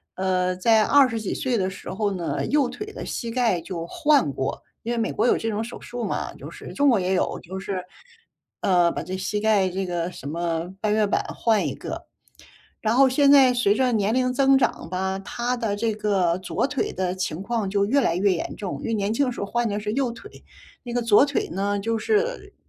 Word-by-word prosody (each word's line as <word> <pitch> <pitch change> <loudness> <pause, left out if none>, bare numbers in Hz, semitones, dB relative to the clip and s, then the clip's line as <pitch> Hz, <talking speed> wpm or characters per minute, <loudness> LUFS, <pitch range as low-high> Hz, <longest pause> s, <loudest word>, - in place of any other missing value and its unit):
呃， 185 -1 0
在 220 +4 +4
20 255 -3 +4
几 215 - -3
岁 250 -3 -1
的 190 -1 0
时 190 - -9
候 205 +2 -1
呢， 180 -3 -2
右 285 -3 +2
腿 420 - -6
的 - - -7
膝 235 - -4
盖 230 -7 +1
就 165 0 -5
换 295 - +2
过。 135 0 -3 0.2
因 235 - -2
为 - - -2
美 225 -1 0
国 - - +1
有 - - +4
这 225 - -2
种 210 0 -2
手 240 - -8
术 240 -1 -5
嘛， - - -3
就 - - -9
是 - - -10
中 285 - +2
国 230 -6 +4
也 185 +1 0
有 180 - 0
就 190 +2 -7
是， 190 -1 -4 0.8
呃， 175 -3 +4
把 - - -4
这 185 - -5
膝 205 +2 -2
盖 210 -3 +3
这 190 +1 -3
个 175 -1 -2
什 140 - -9
么 170 +2 -2
半 210 0 0
月 215 0 +3
板 200 - +1 0.2
换 220 -3 +2
一 - - -4
个。 - - -7 0.8
然 220 +1 +1
后 270 +2 +6
现 280 +2 +4
在 270 -3 +7
随 240 -5 +2
着 255 +1 +2
年 215 0 +1
龄 255 0 +1
增 270 +1 +4
长 265 - 0
吧， 190 +1 -2
他 240 +5 -3
的 225 -4 -1
这 225 +1 0
个 195 -5 +1
左 180 +2 -2
腿 280 -2 -2
的 185 -1 -1
情 180 -2 -3
况 220 -1 -2
就 200 +1 +1
越 265 +8 +3
来 200 -10 +1
越 195 +1 +3
严 170 - -3
重。 200 -3 -5
因 - - -5
为 230 - -1
年 205 0 0
轻 275 +5 +1
的 250 - -1
时 - - -7
候 200 - -2
换 240 +3 0
的 205 0 -2
是 210 0 -3
右 260 -2 0
腿， 395 - -12 0.5
那 240 -1 -5
个 245 - +1
左 230 +4 +5
腿 280 - -1
呢 200 +3 -1
就 225 +2 -1
是， 450 - -1
210 Hz, 250 characters per minute, -24 LUFS, 185-245 Hz, 0.8 s, 在